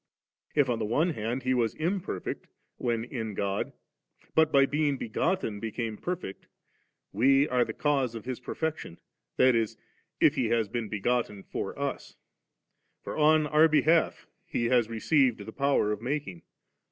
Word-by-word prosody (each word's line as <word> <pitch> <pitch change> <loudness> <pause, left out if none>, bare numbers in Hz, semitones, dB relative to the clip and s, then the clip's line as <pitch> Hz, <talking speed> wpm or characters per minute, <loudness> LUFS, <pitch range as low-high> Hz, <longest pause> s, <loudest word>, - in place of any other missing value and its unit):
If 145 -3 +4
on 120 -2 -1
the 110 - -1
one 155 +11 +1
hand 120 0 -3
He 130 0 +1
was 115 -3 +1
imperfect, 170 - -3 0.3
when 115 -2 -1
in 115 -4 -5
God, 100 0 -2 0.6
but 160 -1 +4
by 135 -1 +6
being 145 0 0
begotten 115 - -1
became 115 0 -4
perfect 175 - -5 0.3
', - - -39 0.3
we 135 +7 +4
are 125 -1 +2
the - - -5
cause 135 -5 0
of 110 - -7
His 130 -1 -4
perfection, 155 - -4 0.4
that 130 0 +5
is, 115 -2 0 0.4
if - - +5
He - - 0
has 115 -2 +1
been 115 0 -4
begotten 105 -1 -1
for - - -5
OS; - - -4 0.9
for - - -5
on 155 0 +4
our 150 +2 +5
behalf 160 +1 +2 0.2
He 120 - -1
has 120 -3 +3
received 120 +1 +2
the 110 - -8
power 140 -6 +2
of 105 0 -3
making. 125 - -3
125 Hz, 160 wpm, -28 LUFS, 110-150 Hz, 0.9 s, by